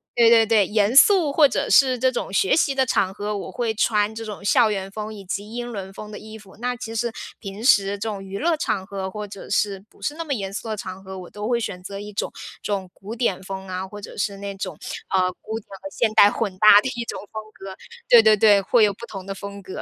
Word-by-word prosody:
对 235 -1 +6
对 225 -1 +7
对， 220 -3 +3
严 210 +2 +1
肃 335 0 +6
或 295 0 +6
者 270 - -2
是 260 -3 +5
这 260 +1 +3
种 220 -5 -4
学 195 - +3
习 285 -4 +2
的 265 -1 +2
场 190 -3 +1
合， 210 +1 -3
我 - - -6
会 235 -2 -1
穿 210 0 +1
这 225 - -6
种 205 -2 -8
校 215 +1 +4
园 195 -1 -3
风 215 +1 -6
以 205 -2 -10
及 200 +5 -5
英 240 0 -5
伦 195 -2 -7
风 210 +2 -9
的 210 - -7
衣 220 0 -10
服。 195 -2 -17
那 250 +1 -2
其 225 -2 -7
实 235 +1 -1 0.3
平 200 +1 -8
时 200 -7 +4
这 220 +1 -3
种 200 -2 -5
娱 195 +1 -6
乐 330 0 +1
场 195 -9 -1
合 190 -1 -5
或 210 0 -6
者 195 -1 -10
是 200 -1 0
不 - - -24
是 295 - -2
那 330 - -4
么 295 -3 -2
严 195 -5 -4
肃 215 +3 -6
的 215 - -2
场 190 -1 -7
合， 190 0 -8
我 180 - -10
都 210 +1 -6
会 240 0 +1
选 180 -5 -5
择 200 +1 -7
一 210 0 -8
种 - - -2 0.3
这 205 - -1
种 190 -2 -3
古 210 +4 -9
典 210 -6 -1
风 190 0 -7
啊， 185 +1 -4
或 205 +1 -10
者 - - -10
是 200 -1 -2
那 200 0 -6
种， 190 -1 -5 0.3
啊， 190 - +2 0.2
古 220 +1 -5
典 - - -22
和 195 - -7
现 230 -3 +1
代 205 - +7
混 200 -5 -3
搭 205 +1 +8
的 260 - -3
一 235 - -2
种 - - -5
风 215 0 -6
格。 190 -1 -9 0.3
对 235 -2 +9
对 215 -1 +6
对， 205 -1 +5
会 220 +3 +3
有 205 - +4
不 235 - -10
同 195 -4 -8
的 195 0 -5
风 200 +1 -8
格。 185 - -7
210 Hz, 290 characters per minute, -23 LUFS, 195-230 Hz, 0.3 s, 对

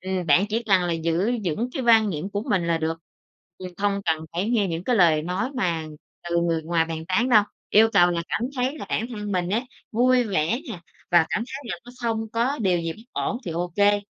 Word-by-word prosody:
ừm, 185 -1 -3
bạn 175 +7 +5
chỉ 225 +2 -1
cần 195 -5 +3
là 175 -1 -1
giữ 165 +6 0
vững 200 +9 -1
cái 265 - -3
quan 225 -3 +5
niệm 165 +4 -4
của 205 +1 -2
mình 185 -5 +1
là 165 -1 +1
được, 160 +1 -2 0.6
ừm, 185 - -6
không 200 0 0
cần 160 0 0
phải 180 +5 -1
nghe 220 -5 +2
những 165 +1 -4
cái 245 -2 +1
lời 160 -5 +4
nói 185 +10 -2
mà 170 -10 -1 0.4
từ 170 - 0
người 165 -2 0
ngoài 165 0 +1
bàn 160 -1 -5
tán 235 +8 +2
đâu. 215 -4 +6 0.3
Yêu 220 +2 +6
cầu 175 -3 +5
là 170 -1 -1
cảm - - -1 0.2
thấy 260 +5 -1
là - - -7
bản 225 - -1
thân 210 -3 -5
mình 180 -2 0
á, 220 +4 +1 0.3
vui 250 +2 +3
vẻ 200 - 0
nè, 175 - -7 0.3
và 170 -2 +5
cảm - - +1
thấy 270 +2 -7
là 175 - -4
nó 245 - -11
không 225 -2 -2
có 245 +5 0
điều 185 -4 +2
gì 165 -1 -3
bất 220 - -15
ổn - - -2
thì - - -4
ô 175 +1 -3
kê. 205 0 +4
190 Hz, 240 wpm, -24 LUFS, 170-225 Hz, 0.6 s, đâu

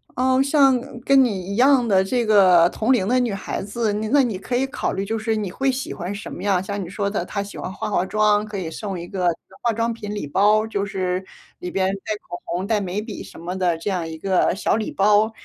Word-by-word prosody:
哦， 260 +1 +3
像 275 -2 +4 0.2
跟 275 +1 +5
你 200 -5 -2
一 - - -3
样 255 0 +4
的 190 -2 +4
这 240 +4 0
个 185 -5 +6
同 220 +6 0
龄 230 -7 +2
的 250 +4 +2
女 240 -4 0
孩 195 - -4
子， 210 +1 -1
你 215 +1 -2
那 285 +4 +5
你 230 -7 -1
可 245 +6 -2
以 265 +2 0
考 - - -2
虑 195 - -3
就 225 +3 -2
是 220 0 -1
你 205 -3 -2
会 270 +8 0
喜 260 +1 -4
欢 180 +2 -5
什 205 - -7
么 - - -7
样。 195 -3 +2
像 200 +1 -4
你 170 - -8
说 200 +1 -2
的 200 -3 -2
她 200 - -3
喜 200 0 -8
欢 - - -5
化 195 - -4
化 195 -3 +1
妆， 210 +1 +2
可 210 -1 -6
以 180 -4 -4
送 195 +1 -5
一 170 - -7
个 180 -1 -1 0.3
化 235 - +1
妆 230 +1 -1
品 210 -2 -6
礼 205 -8 -4
包， 210 +7 +3
就 205 -2 -2
是 185 -2 -2 0.4
里 180 - -5
边 190 -1 +1 0.2
带 220 - -1
口 175 - -7
红， 180 +3 -3
带 215 -1 +1
眉 195 +2 -3
笔 215 -2 -7
什 - - -12
么 175 +3 -5
的， 175 -3 +1
这 165 +5 -4
样 180 -4 -1
一 160 0 -7
个 185 +2 +1
小 195 - 0
礼 220 0 -2
包， 210 +2 +3
205 Hz, 275 characters per minute, -22 LUFS, 190-225 Hz, 0.4 s, 个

